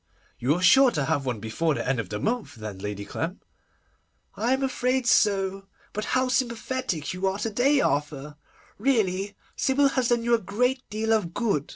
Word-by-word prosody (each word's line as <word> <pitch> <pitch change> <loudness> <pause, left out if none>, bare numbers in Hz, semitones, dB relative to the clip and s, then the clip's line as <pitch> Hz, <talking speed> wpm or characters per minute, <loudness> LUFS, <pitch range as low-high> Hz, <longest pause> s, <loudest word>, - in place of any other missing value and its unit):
'You 135 +6 +2
are 180 - -3
sure 265 +8 +7
to 150 - -1
have 145 -3 -1
one 120 -4 -2
before 125 +9 -1
the - - -3
end 130 -2 +1
of 105 -5 -4
the 105 - -4
month 235 - -2
then, 105 -4 -7
Lady 100 0 -5
Clem?' 170 - -4 1.0
'I 235 +4 +1
am 265 +1 0
afraid 255 -1 0
so. 195 -3 +2 0.3
But 210 - -3
how 255 0 +2
sympathetic 245 - -2
you 185 +1 -1
are 190 +1 -1
to 220 +2 -3
day, 275 +6 +3
Arthur! 145 0 -2 0.4
Really, 205 -5 0 0.2
Sybil 275 +1 +3
has 255 -3 0
done 235 -1 +1
you 235 0 +1
a 235 - +4
great 250 +7 0
deal 220 +1 0
of 180 -6 -1
good. 200 - 0
200 Hz, 190 wpm, -26 LUFS, 150-245 Hz, 1.0 s, sure